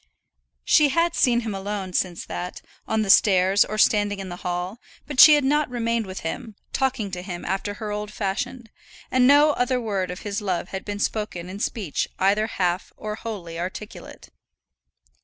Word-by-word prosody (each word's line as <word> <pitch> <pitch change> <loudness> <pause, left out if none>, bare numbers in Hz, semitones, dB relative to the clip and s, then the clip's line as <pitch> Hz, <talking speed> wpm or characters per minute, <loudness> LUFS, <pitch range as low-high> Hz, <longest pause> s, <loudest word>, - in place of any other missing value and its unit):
She 300 -1 +5
had 335 +4 +1
seen 240 -2 +3
him 220 -3 -4
alone 195 -1 -4
since 175 -1 -1
that, 180 +1 -6 0.2
on 220 0 +1
the 200 - -4
stairs, 190 -1 +5
or 215 - -5
standing 205 -1 +3
in 195 -1 -6
the 175 - -6
hall, 180 +5 -4 0.3
but 290 -3 -5
she 300 +1 +10
had 295 - +1
not 295 +2 +2
remained 230 -3 -1
with 185 0 -6
him, 220 +6 -5 0.2
talking 260 -7 -1
to 180 -1 -5
him 180 -2 -7
after 195 +2 -2
her 215 -1 -5
old 210 0 -4
fashion, 215 +5 -3 0.5
and 255 -1 +4
no 290 +2 +6
further 250 +1 +1
word 200 -6 -2
of 180 +1 -6
his 205 0 -3
love 185 -3 -2
had 190 - -5
been 205 -1 -4
spoken 205 -4 -3
in 195 +2 -7
speech 205 -7 -2
either 205 +3 +2
half 180 -4 -1
or 215 0 -5
wholly 190 -7 -6
articulate. 185 +4 -7
205 Hz, 180 wpm, -24 LUFS, 185-235 Hz, 0.5 s, she